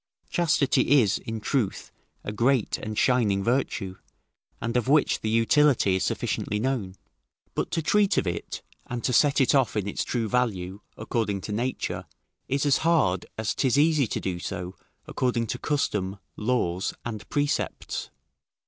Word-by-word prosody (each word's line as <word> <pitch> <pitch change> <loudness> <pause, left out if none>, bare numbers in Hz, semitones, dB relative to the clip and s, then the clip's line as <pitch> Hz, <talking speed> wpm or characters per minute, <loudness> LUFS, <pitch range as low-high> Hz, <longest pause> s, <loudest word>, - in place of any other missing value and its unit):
Chastity 145 -4 +3
is, 105 -5 +2
in 115 0 -5
truth, 110 -2 -1 0.3
a - - -4
great 120 +2 +1
and 110 0 -5
shining 110 -7 +2
virtue, 110 -6 -1 0.6
and 115 +1 -3
of 125 0 +1
which 145 +1 +3
the 110 - -1
utility 115 -3 +4
is 95 - -1
sufficiently 105 - -1
known; 110 -6 -2 0.6
but - - -2
to 165 - -1
treat 205 +4 +3
of - - +2
it, 85 -1 -4 0.2
and 120 -1 -4
to 125 - 0
set 145 +3 +4
it 135 - +4
off 135 -5 +2
in 100 -1 -1
its 100 - -2
true 115 -3 -1
value, 100 -5 -1 0.2
according 110 -2 -1
to 105 - -6
nature, 120 +5 -2 0.4
is 140 +2 0
as 140 -2 +4
hard 150 - +2
as 110 -1 -1
'tis 130 -1 +1
easy 150 -3 +4
to - - -2
do 90 -2 -3
so 90 +1 -5 0.3
according 125 -2 0
to - - -4
custom, 105 -9 -1 0.2
laws, 105 -6 -1
and 110 -3 -6
precepts. 145 0 -2
115 Hz, 155 wpm, -26 LUFS, 100-135 Hz, 0.6 s, utility